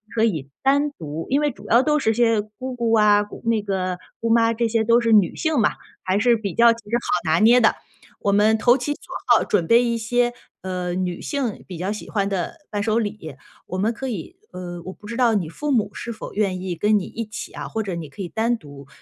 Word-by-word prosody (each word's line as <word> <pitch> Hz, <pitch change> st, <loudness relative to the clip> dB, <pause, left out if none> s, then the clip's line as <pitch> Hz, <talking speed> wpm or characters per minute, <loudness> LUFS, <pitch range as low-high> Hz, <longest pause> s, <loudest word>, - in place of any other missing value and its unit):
可 220 Hz, -, +2 dB
以 160 Hz, -12 st, 0 dB
单 285 Hz, +2 st, +2 dB
独 160 Hz, -, -6 dB
因 280 Hz, +2 st, +3 dB
为 295 Hz, -, +2 dB
主 210 Hz, -6 st, -11 dB
要 235 Hz, +4 st, +5 dB
都 300 Hz, +2 st, +2 dB
是 225 Hz, -6 st, +1 dB
些 230 Hz, -1 st, +3 dB
姑 230 Hz, +5 st, -8 dB
姑 235 Hz, -2 st, 0 dB
啊， 210 Hz, -2 st, +5 dB
姑 210 Hz, -, -11 dB
那 230 Hz, -2 st, +2 dB
个 185 Hz, -3 st, -2 dB, 0.2 s
姑 230 Hz, -, -2 dB
妈 230 Hz, 0 st, +4 dB
这 230 Hz, +1 st, 0 dB
些 225 Hz, 0 st, +1 dB
都 230 Hz, +2 st, +4 dB
是 230 Hz, -1 st, +1 dB
女 205 Hz, -5 st, +4 dB
性 315 Hz, -4 st, 0 dB
嘛， 210 Hz, -, +3 dB, 0.3 s
还 190 Hz, +1 st, +1 dB
是 240 Hz, +2 st, +4 dB
比 205 Hz, -5 st, -4 dB
较 235 Hz, +4 st, +6 dB
其 230 Hz, -, -12 dB
实 235 Hz, -, +1 dB
好 175 Hz, -8 st, -1 dB
拿 160 Hz, -, +3 dB
捏 235 Hz, +3 st, +6 dB
的。 220 Hz, -, +4 dB, 0.5 s
我 200 Hz, -, +1 dB
们 210 Hz, +2 st, +4 dB
投 240 Hz, +3 st, +4 dB
其 270 Hz, +3 st, -3 dB
所 -, -, -17 dB, 0.3 s
好 -, -, +5 dB
准 185 Hz, -5 st, +1 dB
备 235 Hz, +1 st, +5 dB
一 235 Hz, -1 st, 0 dB
些， 240 Hz, +2 st, +1 dB, 0.3 s
呃， 180 Hz, -1 st, -3 dB
女 180 Hz, -1 st, -2 dB
性 270 Hz, -8 st, -3 dB
比 180 Hz, -, -7 dB
较 185 Hz, +3 st, -2 dB
喜 210 Hz, -, -7 dB
欢 200 Hz, -2 st, 0 dB
的 195 Hz, -, -3 dB
伴 205 Hz, -, -2 dB
手 220 Hz, +2 st, +1 dB
礼， 205 Hz, -, -5 dB, 0.3 s
我 185 Hz, -, -4 dB
们 210 Hz, +4 st, +1 dB
可 265 Hz, +3 st, -5 dB
以 245 Hz, -, -6 dB
呃， 175 Hz, -1 st, -7 dB
我 185 Hz, -, -7 dB
不 210 Hz, -, -14 dB
知 230 Hz, +1 st, -5 dB
道 245 Hz, -3 st, +3 dB
你 185 Hz, -7 st, -1 dB
父 295 Hz, -, -3 dB
母 230 Hz, -6 st, +1 dB
是 235 Hz, -, -5 dB
否 215 Hz, -, -8 dB
愿 195 Hz, -3 st, -1 dB
意 185 Hz, -2 st, -3 dB
跟 210 Hz, +5 st, +2 dB
你 -, -, -5 dB
一 230 Hz, -, -5 dB
起 215 Hz, +2 st, -7 dB
啊？ -, -, -6 dB
或 225 Hz, -, -3 dB
者 190 Hz, -4 st, -4 dB
你 165 Hz, -2 st, -6 dB
可 200 Hz, -, -9 dB
以 180 Hz, -, -4 dB
单 230 Hz, +4 st, 0 dB
独， 140 Hz, -7 st, -13 dB
215 Hz, 270 characters per minute, -22 LUFS, 185-235 Hz, 0.5 s, 较